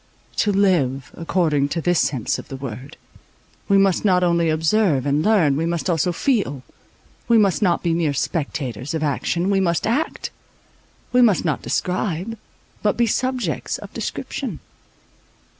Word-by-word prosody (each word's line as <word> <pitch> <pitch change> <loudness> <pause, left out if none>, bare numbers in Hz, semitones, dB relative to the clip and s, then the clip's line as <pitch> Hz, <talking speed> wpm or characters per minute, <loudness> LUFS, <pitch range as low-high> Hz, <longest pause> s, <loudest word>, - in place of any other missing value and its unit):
To 210 - +2
live, 165 -10 +1
according 160 -4 +1
to 165 - -2
this 175 +1 +2
sense 130 -6 0
of - - -10
the 135 - -7
word, 130 +1 -8 0.7
we 200 - +4
must 195 -2 +3
not 180 -3 +3
only 170 -1 +2
observe 160 - +2
and 145 +2 +1
learn, 185 -10 +3
we 160 +3 0
must 170 +2 -1
also 170 +2 +1
feel; 175 - 0 0.6
we 235 - +5
must 200 -3 +3
not 180 -4 +2
be 170 -2 +1
mere 165 -3 +1
spectators 140 -4 -3
of 160 - -2
action, 170 +5 0
we 195 - +3
must 170 -3 +1
act; 275 +9 -1 0.8
we 250 - +5
must 215 -8 +4
not 155 -5 0
describe, 185 +3 -2 0.5
but 210 - +1
be 240 - +3
subjects 245 - -1
of - - -11
description. - - -4
170 Hz, 155 wpm, -21 LUFS, 150-200 Hz, 0.8 s, we